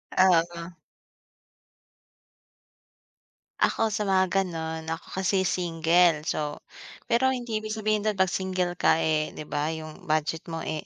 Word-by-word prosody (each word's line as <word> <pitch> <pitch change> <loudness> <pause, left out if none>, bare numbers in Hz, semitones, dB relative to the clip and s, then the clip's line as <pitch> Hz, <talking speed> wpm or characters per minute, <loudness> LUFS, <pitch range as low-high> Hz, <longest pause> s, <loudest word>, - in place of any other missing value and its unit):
Oo. 170 -1 +2 2.8
Ako 225 - +2
sa 210 0 -2
mga 190 -1 +3
gano'n 160 -4 -2
ako 165 0 -5
kasi 190 0 +2
single 170 -2 +2
so, 150 -1 -3 0.5
pero 260 +2 +3
hindi 240 -3 -3
ibig 215 0 -4
sabihin 215 -1 0
do'n 215 - +2
pag 190 -2 +2
single 185 -1 -2
ka, 165 - +3
eh, 155 -1 0
'di 150 - -9
ba, 150 +2 -1
'yong 155 -1 -9
budget 155 +1 -1
mo 165 -1 -5
eh, 155 -1 -4
175 Hz, 135 wpm, -26 LUFS, 160-195 Hz, 2.8 s, mga